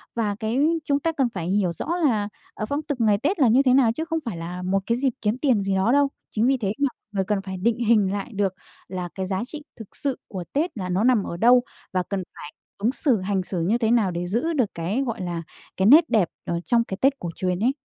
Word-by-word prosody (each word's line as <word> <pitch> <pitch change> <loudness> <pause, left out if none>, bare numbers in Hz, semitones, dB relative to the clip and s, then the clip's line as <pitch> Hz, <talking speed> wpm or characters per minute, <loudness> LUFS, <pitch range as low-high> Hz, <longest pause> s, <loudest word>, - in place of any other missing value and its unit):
Và 215 -3 0
cái 220 +2 -1 0.3
chúng 280 -1 +1
ta 330 +3 0
cần 275 -6 0
phải 170 -4 -4
hiểu 190 -3 +1
rõ - - -6
là, 235 -12 +1 0.2
ờ, 215 - -4
phong 285 +2 -1
tục 290 -5 -4
ngày 210 -2 +4
Tết 335 - -1
là 265 - +5
như 240 +4 +5
thế 255 -2 +4
nào, 255 -4 +5
chứ 320 +6 -3
không 325 0 -1
phải 210 -8 -4
là 175 +2 -6
một 185 +2 +1
cái 235 +1 +1
dịp 260 -1 +1
kiếm 215 +3 0
tiền 255 -8 +2
gì 195 0 0
đó 190 +5 +2
đâu. 285 +1 +4 0.2
Chính 225 +3 +1
vì 270 0 +3
thế 205 -6 -1
mà 280 - +3 0.2
người 195 -2 0
cần 205 0 0
phải 190 -1 -6
định 230 +2 +2
hình 215 -4 +3
lại 205 +4 -4
được 195 -2 0 0.3
là 180 -1 -4
cái 190 - -2
giá 190 +2 -2
trị 300 +2 -8 0.2
thực 220 - -11
sự 275 -3 -2
của 185 -4 -5
Tết 305 0 -1
là 185 -2 -4
nó 185 +4 +1
nằm 245 -4 +4
ở 170 - -5
đâu, 245 +4 +5 0.3
và 185 -1 +1
cần 195 -2 -2
phải 150 - -9 0.3
ứng 215 +5 +1
xử, 260 -6 +1
hành 190 0 -1
xử 180 -1 -3
như 200 +8 +2
thế 225 -2 +1
nào 220 -6 +3
để 175 +1 -3
giữ 240 - 0
được 250 -9 +1
cái, 180 +10 -1
gọi 230 -4 -3
là, 175 -2 -3 0.3
cái 190 - +2
nét 305 +9 +7
đẹp 200 -7 +3 0.2
ở 170 - -1
trong 235 -1 +3
cái 190 -4 -6
Tết 275 +1 +3
cổ 175 - -4
truyền 180 -1 -1
ấy. 240 +5 +3
215 Hz, 270 wpm, -24 LUFS, 190-255 Hz, 0.3 s, nét